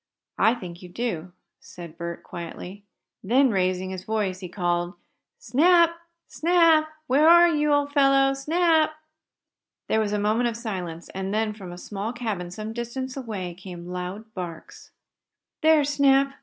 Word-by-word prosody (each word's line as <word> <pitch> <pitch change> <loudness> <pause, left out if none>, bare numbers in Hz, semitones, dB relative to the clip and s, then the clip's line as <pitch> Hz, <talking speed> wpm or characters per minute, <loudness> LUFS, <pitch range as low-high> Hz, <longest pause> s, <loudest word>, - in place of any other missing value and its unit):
"I 225 - +4
think 175 -6 -9
you 180 - -11
do," 180 -4 -4 0.3
said 170 -2 -11
Bert, 170 0 -6
quietly. 180 +3 -8 0.4
Then 255 +5 +3
raising 185 -1 0
his 185 -1 -6
voice, 205 -4 -2
he 185 -2 -7
called: 175 -1 -1 0.4
"Snap! 335 +8 +4 0.3
Snap! 330 -2 +3 0.2
Where 295 +3 +4
are 345 +1 +8
you, 300 -3 +1
old 285 0 +1
fellow? 275 -1 +4
Snap!" 315 +2 +2 0.9
There 220 - +2
was 210 -2 0
a 210 - 0
moment 215 +4 +1
of 230 - -6
silence, 180 -8 -6
and 190 0 -4
then, 215 0 0
from 190 -4 -10
a 175 - -9
small 205 +5 -5
cabin 215 -8 -4
some 215 +5 -6
distance 245 +2 -5
away, 210 -9 -5
came 175 -1 -10
loud 190 +5 -6
barks. 175 -3 -8 0.7
"There's 310 -2 +4
Snap! 275 -1 +3
220 Hz, 150 wpm, -25 LUFS, 180-275 Hz, 0.9 s, are